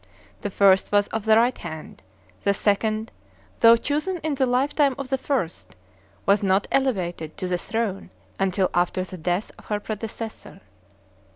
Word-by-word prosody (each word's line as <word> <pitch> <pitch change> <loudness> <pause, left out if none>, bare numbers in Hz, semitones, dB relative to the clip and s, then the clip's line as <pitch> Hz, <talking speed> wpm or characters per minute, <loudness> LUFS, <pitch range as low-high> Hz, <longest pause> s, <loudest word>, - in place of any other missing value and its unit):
The 205 - -2
first 195 -1 +4
was 205 0 +3
of 225 -1 -3
the 220 0 +6
right 240 +2 +3
hand; 160 -2 -9 0.4
the 200 - +2
second, 215 +2 0 0.5
though 230 0 +8
chosen 305 +9 -1
in 310 -1 0
the 265 -1 +1
lifetime 275 +2 +2
of 275 -2 -6
the 270 - +2
first, 175 - -3 0.5
was 200 +1 +4
not 195 0 +2
elevated 180 - -1
to 185 - -3
the 180 -1 -1
throne 215 -1 -2 0.3
until 190 0 +1
after 175 +1 +1
the 185 -1 -9
death 175 +5 -1
of - - -16
her 210 -1 -1
predecessor. 220 -1 -6
205 Hz, 160 wpm, -24 LUFS, 185-245 Hz, 0.5 s, though